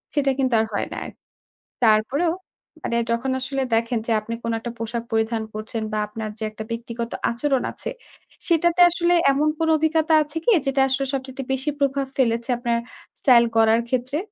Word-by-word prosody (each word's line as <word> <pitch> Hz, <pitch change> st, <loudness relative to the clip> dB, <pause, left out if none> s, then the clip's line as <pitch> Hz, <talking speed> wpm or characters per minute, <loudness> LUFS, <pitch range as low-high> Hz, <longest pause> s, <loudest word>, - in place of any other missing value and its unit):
সেটা 280 Hz, -2 st, +2 dB
কিন্তু 260 Hz, -2 st, +1 dB
আর 220 Hz, -, +2 dB
হয় -, -, -1 dB
না -, -, -6 dB
আর। -, -, -7 dB, 0.7 s
তারপরেও 235 Hz, +10 st, +3 dB, 0.5 s
মানে 235 Hz, -, -1 dB
যখন 235 Hz, +3 st, 0 dB
আসলে 270 Hz, +1 st, -2 dB
দেখেন 230 Hz, +1 st, +1 dB
যে -, -, 0 dB
আপনি 230 Hz, +2 st, -6 dB
কোন 230 Hz, -, -1 dB
একটা 235 Hz, +1 st, -5 dB
পোশাক 230 Hz, +1 st, -3 dB
পরিধান 225 Hz, 0 st, 0 dB
করছেন 220 Hz, +1 st, -4 dB
বা, -, -, 0 dB
আপনার 215 Hz, +1 st, -5 dB
যে -, -, -4 dB
একটা 215 Hz, 0 st, -7 dB
ব্যক্তিগত 235 Hz, 0 st, -4 dB, 0.2 s
আচরণ 260 Hz, +3 st, 0 dB
আছে, -, -, -6 dB, 0.6 s
সেটাতে 340 Hz, +1 st, +2 dB
আসলে 345 Hz, 0 st, +2 dB, 0.2 s
এমন 290 Hz, +3 st, +1 dB
কোন 325 Hz, -, +1 dB
অভিজ্ঞতা 315 Hz, +1 st, +2 dB
আছে 295 Hz, +2 st, -6 dB
কি? -, -, +3 dB, 0.2 s
যেটা 270 Hz, 0 st, +2 dB
আসলে 270 Hz, +1 st, 0 dB
সবচাইতে 265 Hz, 0 st, -4 dB
বেশি 265 Hz, +3 st, -1 dB
প্রভাব 275 Hz, -1 st, +1 dB
ফেলেছে 235 Hz, -1 st, +1 dB
আপনার 235 Hz, -1 st, 0 dB, 0.4 s
স্টাইল 245 Hz, -4 st, +6 dB
গড়ার 225 Hz, +1 st, +4 dB
ক্ষেত্রে? 255 Hz, +3 st, -1 dB
255 Hz, 175 wpm, -23 LUFS, 230-280 Hz, 0.7 s, স্টাইল